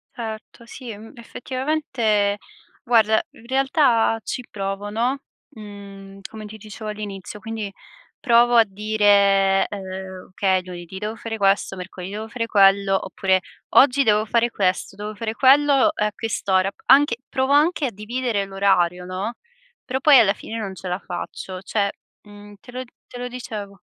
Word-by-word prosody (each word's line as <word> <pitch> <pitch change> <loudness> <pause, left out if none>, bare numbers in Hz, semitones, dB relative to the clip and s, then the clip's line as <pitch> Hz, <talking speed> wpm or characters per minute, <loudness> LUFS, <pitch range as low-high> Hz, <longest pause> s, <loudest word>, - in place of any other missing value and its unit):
Certo, 225 0 -8
sì 245 +1 -10
e 205 - -8
m 220 +2 -12
effettivamente, 235 -5 -1 0.5
guarda, 220 -3 +4
in 225 - -18
realtà 265 -4 +2
ci 250 - -4
provo, 195 0 -4
no, 240 +6 -1 0.3
mhmm, 200 -2 -11
come 215 -1 -9
ti 215 +1 -10
dicevo 215 +1 -8
all'inizio, 210 -1 -7
quindi 220 -1 -5 0.5
provo 240 -1 +4
a 230 - +7
dire, 200 -1 +3
ehm: 190 -1 -7
"Okay, 190 0 +1
lunedì 175 0 -8
devo 210 +3 -4
fare 225 0 -5
questo, 195 -1 +2
mercoledì 185 +1 -8
devo 215 +1 -5
fare 230 0 -4
quello". 195 -2 +4
Oppure: 190 -1 +1 0.4
"Oggi 275 0 +6
devo 215 -2 +3
fare 235 +2 +2
questo, 190 -2 -1
devo 210 +1 -6
fare 220 0 -3
quello, 280 +3 +5
uhm, 325 - +5 0.2
a - - -4
quest'ora". 195 -4 0 0.2
Anche 280 -4 +5
provo 265 0 +1
anche 300 +1 +3
a 255 - -2
dividere 225 +1 -2
l'orario, 190 -3 +1
no, 190 +6 -4 0.5
però 260 +1 -2
poi 285 -2 +8
alla 200 -4 +4
fine 225 +2 -8
non 195 -3 -5
ce 185 +1 -8
la 180 +1 -2
faccio. 185 0 -7
Cioè, 200 +1 0 0.4
mhmm, 205 0 -14
te 245 - -14
lo 255 +1 -4 0.2
te - - -10
lo 245 - -4
dicevo. 210 -6 -7
210 Hz, 160 wpm, -22 LUFS, 195-235 Hz, 0.5 s, poi